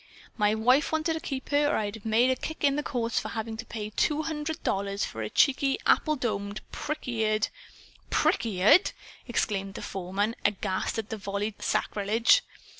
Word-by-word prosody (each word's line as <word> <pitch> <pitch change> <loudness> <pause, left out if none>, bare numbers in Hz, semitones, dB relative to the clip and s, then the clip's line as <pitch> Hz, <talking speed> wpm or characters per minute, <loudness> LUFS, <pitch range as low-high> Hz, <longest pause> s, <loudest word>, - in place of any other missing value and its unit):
"My 210 -1 +2
wife 250 +6 +3
wanted 315 +1 +1
to 320 - -3
keep 275 -5 -5
her, 290 0 +3
or 295 - +1
I'd 205 -1 -2
have 220 -1 -11
made 235 +4 +4
a - - +2
kick 315 +5 -6
in 280 -1 +4
the 295 - 0
courts 240 -5 -1
for - - -5
having 225 0 -4
to 225 - -7
pay 215 -2 -5
two 300 +8 +1
hundred 310 0 -4
dollars 200 0 -1
for 110 - -6
a 105 - -3
cheeky, 275 - +3
apple 305 -1 +3
domed, 205 -5 -3
prick 305 -1 -4
eared 220 -3 +1 0.3
" - - -22 0.2
"Prick - - +2
eared!" 215 - +4 0.3
exclaimed 195 -5 -1
the - - -6
foreman, 195 +4 -2
aghast 195 -1 -1
at 220 -1 -3
the 220 - -4
volleyed 200 +1 -4
sacrilege. 225 - +2
225 Hz, 190 wpm, -28 LUFS, 205-280 Hz, 0.3 s, made